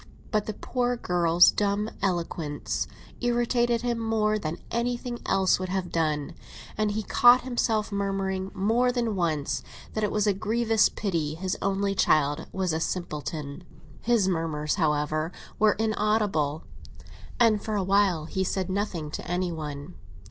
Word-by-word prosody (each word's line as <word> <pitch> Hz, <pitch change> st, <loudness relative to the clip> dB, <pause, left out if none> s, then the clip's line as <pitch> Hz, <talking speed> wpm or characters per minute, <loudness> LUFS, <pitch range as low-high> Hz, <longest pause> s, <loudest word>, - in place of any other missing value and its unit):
But 215 Hz, -2 st, 0 dB
the 215 Hz, -, -3 dB
poor 245 Hz, +1 st, -1 dB
girl's 175 Hz, -3 st, +4 dB
dumb 205 Hz, +1 st, 0 dB
eloquence 170 Hz, -5 st, -2 dB, 0.3 s
irritated 240 Hz, -1 st, +1 dB
him 240 Hz, -1 st, -1 dB
more 215 Hz, -1 st, +1 dB
than 160 Hz, -3 st, -4 dB
anything 240 Hz, +1 st, -2 dB
else 190 Hz, -1 st, +3 dB
would 185 Hz, 0 st, -4 dB
have 185 Hz, -1 st, -2 dB
done, 155 Hz, -3 st, -1 dB, 0.4 s
and 215 Hz, 0 st, +1 dB
he 215 Hz, +1 st, -2 dB
caught 245 Hz, +4 st, +6 dB
himself 230 Hz, -4 st, 0 dB
murmuring 195 Hz, -1 st, -2 dB
more 225 Hz, +6 st, +2 dB
than 235 Hz, -4 st, -1 dB
once 160 Hz, -6 st, -1 dB, 0.3 s
that 215 Hz, -, -2 dB
it 210 Hz, -, +1 dB
was 210 Hz, -1 st, +1 dB
a 205 Hz, -, +3 dB
grievous 220 Hz, +2 st, +2 dB
pity 165 Hz, -7 st, -2 dB
his 185 Hz, +2 st, -2 dB
only 195 Hz, 0 st, 0 dB
child 145 Hz, -5 st, +2 dB
was 185 Hz, -3 st, -1 dB
a 160 Hz, -, 0 dB
simpleton. 155 Hz, -2 st, -4 dB, 0.4 s
His 230 Hz, -5 st, +2 dB
murmurs, 160 Hz, -4 st, -1 dB
however, 155 Hz, 0 st, 0 dB, 0.3 s
were 215 Hz, -1 st, +5 dB
inaudible; 210 Hz, -8 st, 0 dB, 0.8 s
and 220 Hz, -3 st, +4 dB
for 215 Hz, -, -2 dB
a 200 Hz, -, +1 dB
while 190 Hz, -4 st, +2 dB
he 190 Hz, +3 st, -2 dB
said 190 Hz, 0 st, -2 dB
nothing 185 Hz, -6 st, -2 dB
to -, -, -6 dB
any 180 Hz, 0 st, 0 dB
one. 150 Hz, 0 st, -6 dB
195 Hz, 150 wpm, -27 LUFS, 165-220 Hz, 0.8 s, caught